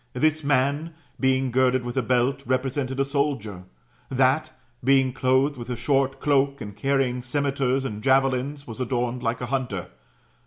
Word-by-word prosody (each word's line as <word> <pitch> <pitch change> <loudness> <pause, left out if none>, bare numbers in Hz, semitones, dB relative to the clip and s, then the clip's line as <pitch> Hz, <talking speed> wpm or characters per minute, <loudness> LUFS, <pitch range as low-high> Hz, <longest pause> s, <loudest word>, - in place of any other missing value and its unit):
This 155 +4 +1
man 145 +4 +1 0.2
being 130 -1 +2
girded 130 0 +2
with 120 - -4
a 130 - +2
belt, 125 +3 +1
represented 130 +1 -1
a 135 - +3
soldier; 135 -10 -2 0.4
that, 135 +3 +2 0.3
being 135 0 +3
clothed 130 +3 +2
with 120 0 -8
a 125 - -2
short 135 +2 0
cloak, 140 -1 +2
and 105 -3 -7
carrying 130 +1 0
cimeters 135 0 0
and 105 -4 -4
javelins, 135 +2 +1
was 115 +1 -7
adorned 125 -1 -1
like 115 0 -2
a - - -2
hunter. 120 -9 -2
130 Hz, 155 wpm, -25 LUFS, 125-140 Hz, 0.4 s, a